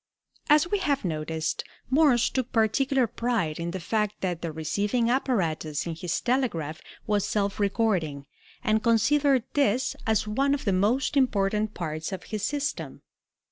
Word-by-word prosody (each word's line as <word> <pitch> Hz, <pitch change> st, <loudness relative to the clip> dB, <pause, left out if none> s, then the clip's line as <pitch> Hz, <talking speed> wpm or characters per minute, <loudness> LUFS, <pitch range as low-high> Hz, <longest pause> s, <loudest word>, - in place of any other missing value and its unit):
As 300 Hz, +3 st, +5 dB
we 410 Hz, +3 st, 0 dB
have 285 Hz, -, 0 dB
noticed, 160 Hz, -1 st, -2 dB, 0.3 s
Morse 270 Hz, -4 st, +4 dB
took 255 Hz, -2 st, -2 dB
particular 255 Hz, +4 st, +2 dB
pride 230 Hz, -9 st, -1 dB
in 170 Hz, 0 st, -2 dB
the 185 Hz, +2 st, -4 dB
fact 210 Hz, +3 st, -1 dB
that 180 Hz, -3 st, -2 dB
the 165 Hz, -, -3 dB
receiving 205 Hz, +10 st, 0 dB
apparatus 170 Hz, -, 0 dB
in 170 Hz, -, -3 dB
his 165 Hz, +2 st, -2 dB
telegraph 225 Hz, -, -1 dB, 0.2 s
was 205 Hz, -2 st, +1 dB
self 200 Hz, -1 st, -1 dB
recording, 190 Hz, -, 0 dB, 0.4 s
and 220 Hz, -2 st, +2 dB
considered 255 Hz, +3 st, +3 dB
this 260 Hz, -3 st, +1 dB
as 220 Hz, -1 st, +1 dB
one 275 Hz, +6 st, +2 dB
of 280 Hz, -, -7 dB
the 200 Hz, -, +2 dB
most 215 Hz, +11 st, +1 dB
important 215 Hz, -5 st, +1 dB
parts 155 Hz, -1 st, -4 dB
of 190 Hz, -, -5 dB
his 215 Hz, -1 st, -5 dB
system. 290 Hz, +3 st, -3 dB
215 Hz, 150 wpm, -26 LUFS, 175-260 Hz, 0.4 s, As